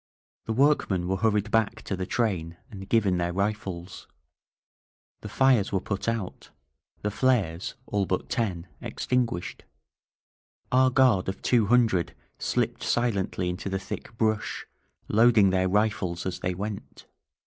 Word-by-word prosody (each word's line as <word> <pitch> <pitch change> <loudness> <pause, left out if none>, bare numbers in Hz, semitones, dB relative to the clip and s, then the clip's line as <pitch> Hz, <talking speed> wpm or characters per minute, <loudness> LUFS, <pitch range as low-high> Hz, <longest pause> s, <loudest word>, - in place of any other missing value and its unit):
The 110 - -2
workmen 110 -9 +2
were 95 +1 0
hurried 105 0 +1
back 110 -2 +1
to 95 - -3
the 95 0 -4
train 90 -8 -1
and 95 -2 -9
given 100 -6 +3
their 85 0 0
rifles. 95 -2 -3 1.1
The - - -8
fires 130 -6 +3
were 95 - +1
put 100 +1 -4
out, 115 -5 -3 0.5
the 105 - 0
flares, 100 -9 0
— - - -35
all 100 -2 -1
but 90 - -1
ten, 95 -8 -2
— - - -34
extinguished. 120 -9 -2 1.1
Our 130 +1 +5
guard 125 -8 +3
of 95 - -6
two 115 -4 +3
hundred 110 -7 +2 0.2
slipped - - -1
silently 100 -6 0
into 90 +2 -3
the 95 - -1
thick 100 +3 -7
brush, 110 -2 -1 0.4
loading 110 -3 +5
their 95 0 +1
rifles 105 -4 0
as 95 -1 -3
they 90 -1 -2
went. 100 +2 -6
100 Hz, 145 wpm, -27 LUFS, 95-115 Hz, 1.1 s, Our